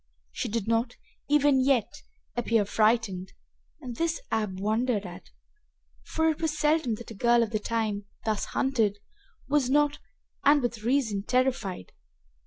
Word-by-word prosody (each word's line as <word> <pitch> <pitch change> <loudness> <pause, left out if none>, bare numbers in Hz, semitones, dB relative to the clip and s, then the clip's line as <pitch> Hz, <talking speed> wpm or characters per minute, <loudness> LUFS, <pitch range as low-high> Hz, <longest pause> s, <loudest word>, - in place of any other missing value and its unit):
She - - -3
did 220 -1 -2
not, 230 +2 0 0.3
even 290 -2 +4
yet, 255 -5 +1 0.3
appear 230 -2 +2
affrighted, 210 -3 +1 0.5
and 250 -4 -6
this 335 0 0
Ab 210 -4 -1
wondered 215 +1 0
at, 180 +1 -10 0.7
for 320 0 0
it 310 - -7
was 310 -2 -1
seldom 300 -6 +2
that 230 +1 -10
a - - -6
girl 235 +3 +3
of 225 - -4
the 215 - 0
time, 215 -2 -2 0.2
thus 215 -2 0
hunted, 225 -7 0 0.5
was 275 -2 +2
not, 295 +1 +2 0.4
and 290 +1 +6
with 235 -2 -2
reason, 230 -4 +1
terrified. 235 - -1
230 Hz, 145 wpm, -27 LUFS, 210-270 Hz, 0.7 s, and